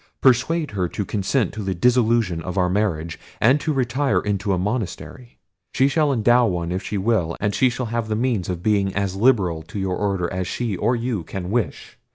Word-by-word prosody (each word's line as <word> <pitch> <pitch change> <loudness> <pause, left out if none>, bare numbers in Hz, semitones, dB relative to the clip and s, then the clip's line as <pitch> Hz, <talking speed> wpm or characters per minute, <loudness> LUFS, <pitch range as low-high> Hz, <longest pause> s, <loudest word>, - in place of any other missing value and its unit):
Persuade 135 +5 +2
her 95 -3 -1
to 105 - -3
consent 105 +3 0
to 110 - -5
the 95 -2 -2
dissolution 115 -4 +2
of 90 +3 -5
our 90 -1 +2
marriage, 85 -6 -1 0.2
and 130 +6 +4
to 155 - -1
retire 135 +1 +1
into 105 0 -1
a 95 - +2
monastery—she 120 +6 -3
shall 145 +1 +2
endow 120 0 +4
one 85 -3 -2
if 90 +1 -2
she 105 - -4
will; 95 -5 0
and 105 0 0
she 130 - +3
shall 125 +1 -3
have 115 0 -2
the 110 - -1
means 115 -6 -1
of 90 -1 -4
being 100 -3 +1
as 100 -1 -1
liberal 95 -8 +2
to 85 +6 -9
your 95 -2 -1
order 95 -3 -1
as 90 0 -2
she 115 -5 -2
or 115 +7 +1
you 120 -4 -2
can 90 +2 -6
wish. 120 -1 -3
105 Hz, 205 wpm, -22 LUFS, 95-120 Hz, 0.2 s, and